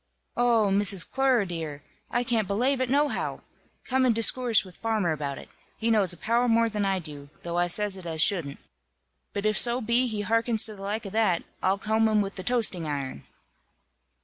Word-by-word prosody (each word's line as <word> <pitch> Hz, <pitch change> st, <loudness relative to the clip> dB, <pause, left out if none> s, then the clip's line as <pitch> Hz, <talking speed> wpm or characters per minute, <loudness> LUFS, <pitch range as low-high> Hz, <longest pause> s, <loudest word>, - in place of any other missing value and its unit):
"Oh, 230 Hz, -4 st, +2 dB
Miss 195 Hz, -2 st, +2 dB
Clerer, 260 Hz, -4 st, +1 dB
dear, 160 Hz, -5 st, -6 dB, 0.3 s
I 240 Hz, -, 0 dB
can't 230 Hz, -4 st, 0 dB
belave 255 Hz, +7 st, 0 dB
it 255 Hz, -, -1 dB
nohow! 290 Hz, +2 st, 0 dB, 0.4 s
Come 260 Hz, 0 st, +1 dB
and 245 Hz, -3 st, +3 dB
discoorse 230 Hz, 0 st, +3 dB
with 185 Hz, -2 st, -13 dB
farmer 220 Hz, -6 st, -1 dB
about 145 Hz, -3 st, -4 dB
it. -, -, -10 dB, 0.3 s
He 230 Hz, +1 st, 0 dB
knows 205 Hz, -5 st, +3 dB
a 175 Hz, -, +1 dB
power 235 Hz, +6 st, +1 dB
more 230 Hz, 0 st, +3 dB
than 210 Hz, -2 st, -2 dB
I 195 Hz, -1 st, +1 dB
do, 145 Hz, -5 st, -9 dB
though 175 Hz, 0 st, -2 dB
I 175 Hz, -, +2 dB
says 200 Hz, +2 st, +1 dB
it 180 Hz, -2 st, -9 dB
as 160 Hz, -1 st, -4 dB
shouldn't. 160 Hz, -5 st, +2 dB, 0.7 s
But 200 Hz, +1 st, -4 dB
if 215 Hz, 0 st, +2 dB
so 240 Hz, +1 st, +3 dB
be 235 Hz, +2 st, +1 dB
he 215 Hz, -3 st, -3 dB
hearkens 230 Hz, +1 st, +2 dB
to 215 Hz, -2 st, +1 dB
the 195 Hz, -, -12 dB
like 210 Hz, +3 st, -4 dB
of 195 Hz, -, -6 dB
that, 215 Hz, -6 st, +1 dB, 0.2 s
I'll 190 Hz, +1 st, +1 dB
comb 220 Hz, +2 st, +1 dB
him 215 Hz, -1 st, +2 dB
with 195 Hz, 0 st, -4 dB
the 185 Hz, -, -6 dB
toasting 195 Hz, -7 st, 0 dB
iron." 140 Hz, -, -5 dB
210 Hz, 200 wpm, -26 LUFS, 180-230 Hz, 0.7 s, and